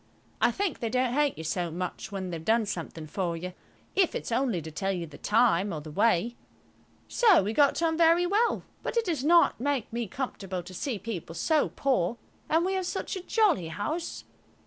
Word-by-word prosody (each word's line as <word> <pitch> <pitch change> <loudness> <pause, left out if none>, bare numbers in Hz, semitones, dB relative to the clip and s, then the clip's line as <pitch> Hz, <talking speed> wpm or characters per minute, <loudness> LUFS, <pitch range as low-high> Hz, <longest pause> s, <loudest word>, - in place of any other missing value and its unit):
I - - +5
think 390 -5 -2
they 230 - -2
don't 255 0 +1
hate 290 0 +1
you 160 - -6
so 175 +2 -1
much 180 +5 -5
when 190 -2 -4
they've 165 -2 -5
done 225 +5 +3
something 170 -4 -5
for 170 +1 -2
you, 180 +2 -6 0.4
if 375 -3 +3
it's - - -4
only 235 -5 +1
to 160 0 -8
tell 195 +6 -1
you 175 -3 -3
the 150 -3 -13
time 210 -3 +3
or 155 - -3
the 150 +1 -9
way. 220 +5 +2 0.7
So 425 - +5
we 210 +3 -2
got 285 +5 +3
on 325 0 +1
very 335 +1 +5
well, 420 +6 +1 0.2
but - - -3
it 460 - +2
does 320 -8 -1
not 335 -3 +5
make 275 -3 -1
me 235 -1 -2
comfortable 195 -6 -4
to 185 +2 -11
see 230 +6 -3
people 185 -6 -6
so 305 - +2
poor 240 -6 0 0.3
and 325 +2 +3
we 380 - 0
have 375 -2 -1
such - - -3
a 375 - -4
jolly 370 - +2
house. 305 - -4
230 Hz, 205 wpm, -28 LUFS, -, 0.7 s, I